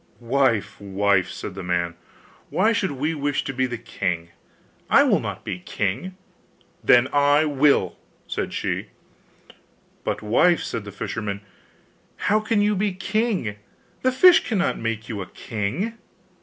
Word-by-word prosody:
'Wife, 120 -4 +1
wife,' 100 -1 +1
said 100 - -6
the 95 - -7
man, 90 -1 -1 0.6
'why 225 +1 +2
should 195 -8 0
we 150 +4 -1
wish 145 -2 -1
to 135 - -4
be 130 0 +1
the 120 -1 -4
king? 90 -7 -3 0.6
I - - +7
will - - +3
not - - -6
be 90 - -4
king.' 105 - -3 0.7
'Then 125 +1 +6
I 145 +2 +4
will,' 145 -1 +2 0.3
said - - -3
she. - - -2 1.2
'But, - - -2
wife,' 165 +11 +3
said 115 -3 -4
the 100 - -7
fisherman, 100 -2 -4 0.7
'how 215 +1 +2
can 215 -1 +1
you 210 0 +2
be 200 0 0
king 190 - -1 0.4
the 255 - +2
fish 345 +7 +7
cannot 195 -5 0
make 115 0 -3
you 105 -3 -4
a 90 - -6
king? 115 - -3
130 Hz, 145 wpm, -23 LUFS, -, 1.2 s, I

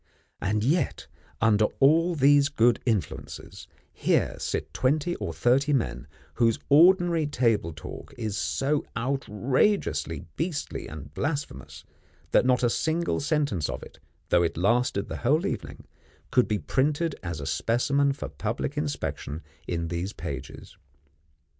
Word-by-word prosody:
And 105 +2 0
yet, 155 +9 0 0.4
under 110 -1 +4
all 165 +5 +4
these 140 0 +5
good 120 -4 +3
influences, 105 - -3 0.3
here - - +1
sit - - -3
twenty 155 +6 +1
or - - -4
thirty 135 +5 +2
men 130 -5 -1 0.3
whose 115 -2 +2
ordinary 170 +1 +5
table 115 - +1
talk - - -9
is 110 -4 -3
so 145 +7 0
outrageously 120 - 0
beastly 160 -3 -3
and 75 -2 -9
blasphemous, 145 +1 -4 0.5
that - - +4
not 125 -1 +3
a 120 - +4
single 165 +5 0
sentence 140 - 0
of - - -5
it, - - -14 0.3
though 85 - +4
it 85 -2 -1
lasted 100 +2 +1
the - - -5
whole 150 +9 +2
evening, 200 - -5 0.5
could 125 -2 +4
be 105 - 0
printed 145 - 0
as 85 -4 -4
a 70 - -5
specimen 140 - +1
for 135 - -5
public 115 +6 -4
inspection, 145 - -3 0.2
in 85 -1 -2
these 85 +4 -3
pages. 70 -5 -7
125 Hz, 135 wpm, -27 LUFS, 105-150 Hz, 0.5 s, these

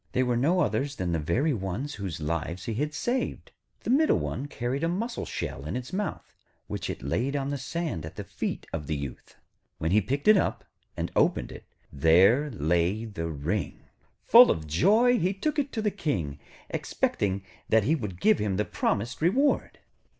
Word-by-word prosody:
They 130 - +2
were 125 -1 +1
no 165 +10 +2
others 140 -3 0
than 90 -5 -2
the 85 - 0
very 125 - +1
ones 110 +7 -3
whose 95 -7 -5
lives 85 +3 -3
he 115 - -2
had 150 +7 -1
saved. 250 +8 -2 0.3
The - - -1
middle 305 +4 +4
one 140 +3 -3
carried 130 +1 -3
a - - +3
mussel 225 +8 -3
shell 70 - -4
in 85 - -3
its 125 +6 -5
mouth, 200 -3 -4 0.3
which - - -4
it - - -5
laid 120 - -1
on 140 0 -1
the 140 - -3
sand 155 - -3
at 80 - -8
the - - -5
feet - - -4
of 75 - -4
the 80 - -1
Youth. 70 -2 -7 0.4
When 80 +1 -1
he 105 +3 +5
picked 140 - -2
it 215 -1 +8
up, - - -1 0.3
and - - -2
opened - - +2
it, - - -11 0.3
there 95 - +5
lay 90 - 0
the 90 -7 -4
ring. 80 +2 -3 0.4
Full - - +9
of 80 - 0
joy, 220 - +4
he 185 +3 0
took 300 +9 -1
it 280 -1 -1
to 220 - -2
the 210 - +2
King, 80 - -2 0.3
expecting 100 -1 -1 0.3
that 110 -1 +4
he 145 - +2
would 105 - -3
give 110 - +4
him 100 -3 0
the 105 - +1
promised 115 +7 -1
reward. 260 - +2
115 Hz, 195 wpm, -27 LUFS, -, 0.4 s, Full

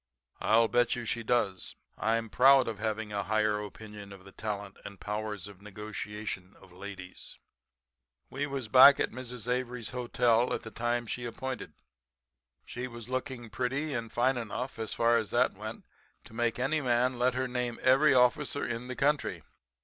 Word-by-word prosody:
'I'll 115 +1 +4
bet 120 +3 +2
you 120 -1 -5
she 115 - -1
does. 110 -5 0 0.2
I'm 115 0 0
proud 135 +4 +6
of 110 -3 -4
having 110 -1 -2
a 100 - 0
higher 105 0 +1
opinion 105 -1 -10
of 95 -1 -12
the 95 - -12
talent 100 -1 -5
and 100 - -8
the - - -26
powers 105 -1 -4
of 100 -2 -13
negotiation 105 -2 -6
of 95 - -17
ladies.' 95 0 -9 0.9
"We 140 +2 -3
was 135 -4 -4
back 130 +4 +9
at - - 0
Mrs. 125 -1 -7
Avery's 125 -2 -2
hotel 120 -1 +2
at - - -6
the 110 - -8
time 120 +2 -1
she 120 +2 -4
appointed. 130 +2 -5 0.9
She 125 +1 -5
was 120 -1 -9
looking 130 -3 -4
pretty 135 +6 -1
and 115 -2 -3
fine 125 +2 +2
enough, 120 +2 -4
as 110 - -3
far 115 0 +3
as 110 - -2
that - - +2
went, - - -8 0.4
to - - -15
make 120 0 0
any 145 +5 +1
man 125 -1 +1
let 125 +1 +2
her 130 0 0
name 125 -1 -2
every 135 +2 +5
officer 130 +3 +3
in 120 +1 -4
the 130 - -5
country. 145 +2 0
120 Hz, 175 wpm, -30 LUFS, 105-125 Hz, 0.9 s, back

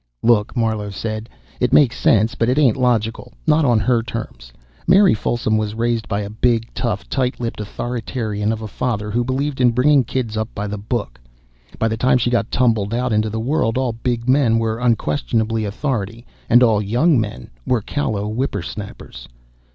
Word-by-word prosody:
"Look," 115 0 +2
Marlowe 110 -3 0
said, 110 +2 -5 0.3
"it - - +1
makes 130 -5 +5
sense, 110 +2 +3
but 115 -1 0
it 130 - +1
ain't 135 -7 +4
logical 120 -2 0
not 155 -1 +3
on 120 -4 +3
her 120 0 +2
terms. 60 - -7 0.4
Mary 190 +2 +6
Folsom 110 0 0
was 105 0 -3
raised 115 -1 -1
by 100 0 -1
a 100 - -5
big, 115 +1 0
tough, 110 -5 -3
tight 130 -2 -1
lipped 115 -3 -4
authoritarian 110 -1 -3
of 110 0 -4
a - - -4
father 105 -2 -3
who 120 +3 +1
believed 130 +2 -2
in 125 - +6
bringing 130 +3 +4
kids 115 -2 -3
up 110 +1 -2
by 105 - -3
the 105 0 -4
book. 105 - -4 0.6
By 115 - +1
the 110 0 -2
time 125 +3 +3
she 120 0 0
got 115 -2 +1
tumbled 115 -4 +1
out 125 -1 0
into 110 0 +1
the 110 +1 -3
world, 125 -1 0
all 130 -3 0
big 115 +1 -3
men 130 -4 +3
were 115 0 -1
unquestionable 110 - 0
authority 115 0 -3 0.2
and 120 +2 +6
all 110 -4 +3
young 125 - +2
men 105 - -6 0.2
were 120 -3 +2
callow 105 -4 -2
whipper 110 -4 -2
snappers. 100 - -8
115 Hz, 185 wpm, -20 LUFS, 110-125 Hz, 0.6 s, Mary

